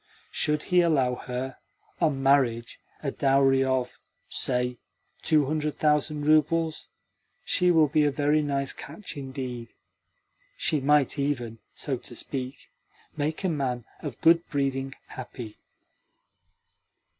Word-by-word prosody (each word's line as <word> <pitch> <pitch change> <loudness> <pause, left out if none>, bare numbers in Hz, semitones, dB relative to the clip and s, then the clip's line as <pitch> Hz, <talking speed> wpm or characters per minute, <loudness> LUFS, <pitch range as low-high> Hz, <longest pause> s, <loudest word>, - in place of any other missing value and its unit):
Should 150 0 +1
he 180 - +7
allow 140 -7 +3
her, 125 +1 -5 0.4
on 145 -5 +1
marriage, 125 -4 +2 0.2
a 140 - -1
dowry 135 -1 +3
of, 130 -1 -1 0.3
say, 125 -1 -1 0.4
two 150 -2 +3
hundred 150 +1 -1
thousand 150 0 +1
roubles, 155 +1 +2 0.6
she 180 - +3
will 160 -3 +5
be 150 +1 +3
a - - +4
very 145 +2 +2
nice 140 -2 -1
catch 210 - -9
indeed. 130 -4 -6 0.8
She 150 - +1
might 145 0 +3
even, 120 -5 -2 0.2
so - - -2
to - - -11
speak, 130 -1 -6 0.4
make 155 +4 -2
a - - +2
man 130 -6 -2
of - - -6
good 165 +1 +6
breeding 135 -2 -1
happy." 120 -3 -8
140 Hz, 120 wpm, -27 LUFS, 130-150 Hz, 0.8 s, he